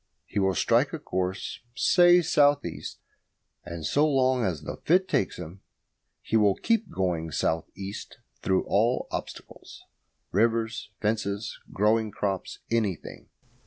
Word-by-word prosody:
He 105 - -3
will 95 -1 +2
strike - - +2
a - - -2
course, 95 +1 -3 0.2
say, 175 +4 +5
south 145 -2 +3
east, - - -6 0.7
and 85 -2 -6
so 145 - +3
long 130 -3 +2
as 80 -7 -2
the - - -6
fit 185 +3 +2
takes 100 - 0
him 90 +3 -9 0.6
he - - -2
will 105 -3 +4
keep 230 -3 0
going 85 -4 -1
south 80 +1 -1
east 100 +3 -7 0.2
through 95 -1 +1
all 115 +5 +1
obstacles - - -8 0.5
rivers, 115 +2 +1
fences, 105 -1 -2
growing 110 +2 +2
crops, 100 -2 -3
anything. 105 -7 -2
105 Hz, 130 wpm, -27 LUFS, 95-125 Hz, 0.7 s, say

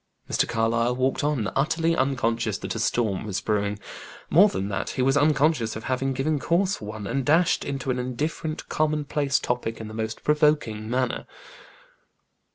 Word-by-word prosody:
Mr. - - +1
Carlyle 115 +2 +1
walked 130 +2 0
on, 145 -8 0
utterly 165 +4 +1
unconscious 115 - 0
that - - -4
a 115 - -4
storm 110 -4 0
was 100 -2 -2
brewing. 105 -1 -1 0.5
More 200 +6 +7
than 100 - -3
that, 100 - -2
he 130 - -1
was 135 +1 +3
unconscious 145 -4 +2
of 110 - -6
having 130 +1 -1
given 140 +3 0
cause 180 +8 +1
for - - -9
one, 105 0 -6
and 135 +6 -1
dashed 160 +5 +3
into 135 -1 -3
an 125 - -1
indifferent, 150 +5 -3
common 155 -1 0
place 140 -1 +1
topic 120 -2 -2
in 110 - -6
the 110 - -9
most 110 0 -4
provoking 150 -8 +2
manner. 125 0 -1
130 Hz, 170 wpm, -25 LUFS, 115-150 Hz, 0.5 s, More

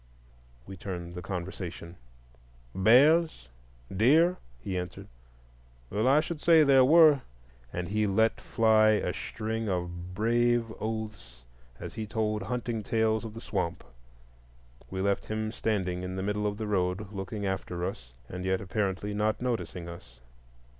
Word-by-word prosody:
We 95 - -9
turned 85 -2 -6
the 90 - -6
conversation. 90 -2 -6 0.8
"Bears? 130 - +4 0.5
deer?" 160 - +4 0.2
he 95 +10 -5
answered, 90 -1 -5 0.8
"well, 110 +4 +1
I 140 +3 +5
should 165 -2 -6
say 165 -2 +6
there 135 -2 +6
were," 155 0 +6 0.5
and 90 0 -4
he 105 +2 0
let 110 +3 +2
fly 110 -1 +4
a 105 - 0
string 110 0 -4
of 90 0 -4
brave 120 +1 +1
oaths, 110 - -6 0.4
as - - -7
he 110 -1 -5
told 105 -1 -1
hunting 120 +1 -3
tales 110 +1 +1
of 110 -1 -8
the 115 - -7
swamp. 95 -7 -3 1.1
We 95 0 -3
left 100 0 0
him 110 0 -2
standing 95 -6 -1
still 90 0 -5
in 95 - -5
the 95 - -3
middle 105 +1 -1
of 100 0 -3
the 110 - -4
road 95 0 -1
looking 100 +1 -5
after 90 -2 -3
us, 60 -10 -6 0.2
and 90 +5 -6
yet 95 0 0
apparently 100 0 -2
not 105 +1 0
noticing 115 -8 -3
us. 65 -8 -11
105 Hz, 145 wpm, -29 LUFS, 90-115 Hz, 1.1 s, say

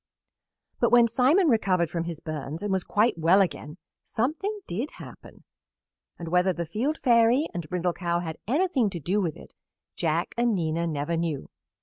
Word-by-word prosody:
But - - +3
when 240 -1 +6
Simon 265 - +3
recovered 185 - +2
from 170 -1 -2
his 170 -2 -5
burns 155 +1 -5
and 205 - -2
was 190 -1 0
quite 210 -3 +1
well 170 +5 +5
again 170 -4 -1 0.3
something 330 - -2
did 230 - -3
happen, - - -13 0.7
and 170 -1 -6
whether 180 +2 +2
the 170 0 -4
Field 240 - -2
Fairy 235 +3 +4
and 170 -3 -5
Brindle 180 -1 -1
Cow 170 -1 -1
had 160 -2 -6
anything 275 - +1
to 180 -3 -6
do 185 +8 0
with 165 -5 -2
it - - -14 0.4
Jack 165 +1 -1
and 235 -2 +1
Nina 165 -1 -1
never 150 +1 -2
knew. 165 -4 -3
180 Hz, 175 wpm, -26 LUFS, 165-235 Hz, 0.7 s, when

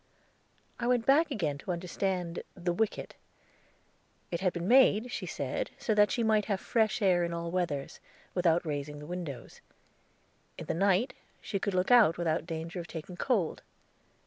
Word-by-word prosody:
I 240 - -1
went 245 -2 +2
back 305 +4 +4
again 160 - -2
to 180 - -4
understand 180 0 -2
the 175 -1 -1
wicket. 220 +3 -2 1.2
It 170 - -1
had 185 -2 +2
been 175 0 -4
made, 245 -2 +5
she - - -4
said, - - -3
so 220 - 0
that 210 0 +5
she 235 - 0
might 215 -2 +3
have 200 -3 -1
fresh 220 0 +1
air 180 -3 +4
in 170 0 -2
all 170 0 -4
weathers, 170 -6 -2 0.3
without 175 -1 +2
raising 150 -1 -4
the 150 - -9
windows. 160 -7 -7 1.0
In - - -7
the - - -1
night 195 +7 +2 0.3
she 195 - -3
could 200 -1 -2
look 185 +5 +1
out 225 -9 +6
without 165 -1 -1
danger 165 +1 -5
of 170 - -6
taking 165 +2 -7
cold. 195 -5 0
180 Hz, 170 wpm, -30 LUFS, 170-215 Hz, 1.2 s, out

